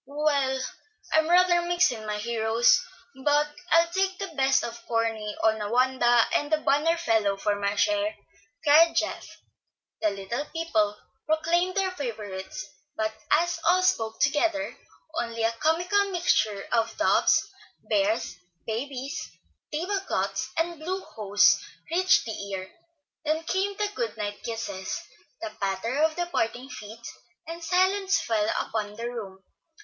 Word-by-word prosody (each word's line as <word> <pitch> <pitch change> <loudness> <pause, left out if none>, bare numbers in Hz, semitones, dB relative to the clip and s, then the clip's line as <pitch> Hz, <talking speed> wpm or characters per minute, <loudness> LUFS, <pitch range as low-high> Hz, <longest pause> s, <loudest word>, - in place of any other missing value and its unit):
"Well, 280 -2 +1 0.5
I'm 315 +1 +3
rather 355 0 +5
mixed 350 0 +3
in 220 -3 -7
my 210 0 -2
heroes, 225 +1 +3 0.4
but 295 +1 +3 0.2
I'll 335 +1 +5
take 380 +1 0
the 390 -1 -4
best 270 -1 +3
of 235 0 -6
Corny, 225 -2 -1
Onawandah, 240 +3 +3
and 290 +1 +1
the 310 - +4
banner 305 +3 +2
fellow 220 -11 +1
for 205 +1 0
my 200 0 -1
share," 310 +7 +1 0.5
cried 320 +3 +6
Geoff. - - -1 0.7
The 215 - +3
little 200 +8 -4
people 220 -12 0 0.3
proclaimed 340 +4 +1
their 385 -1 +1
favorites; 210 - -6 0.3
but 220 0 -1 0.2
as 340 +2 +2
all 360 +3 +4
spoke 225 -12 +1
together, 295 +1 +1 0.5
only 230 -1 -3
a 225 - +3
comical 355 - +1
mixture 220 - +1
of 230 -2 +1
doves, - - +3 0.4
bears, 305 - +1 0.3
babies, 265 +5 -4 0.4
table 360 +6 -1
cloths - - -1
and 335 0 -1
blue 370 +5 -3
hose 205 - +3 0.3
reached 370 +2 +4
the 225 - -4 0.2
ear. 190 -1 -5 0.5
Then 315 +1 0
came 385 +4 -1
the 415 -1 -1
good 230 -3 -3
night 205 -1 -4
kisses, 225 -5 -4 0.4
the 220 - -3
patter 195 +7 -1
of 315 0 +3
departing 265 -8 -2
feet, 225 -1 -10 0.4
and 335 +1 -7
silence 375 +3 +2
fell 220 -2 0
upon 210 -2 -3
the 230 +2 -4
room. 200 -6 -7
270 Hz, 135 wpm, -27 LUFS, 220-335 Hz, 0.7 s, cried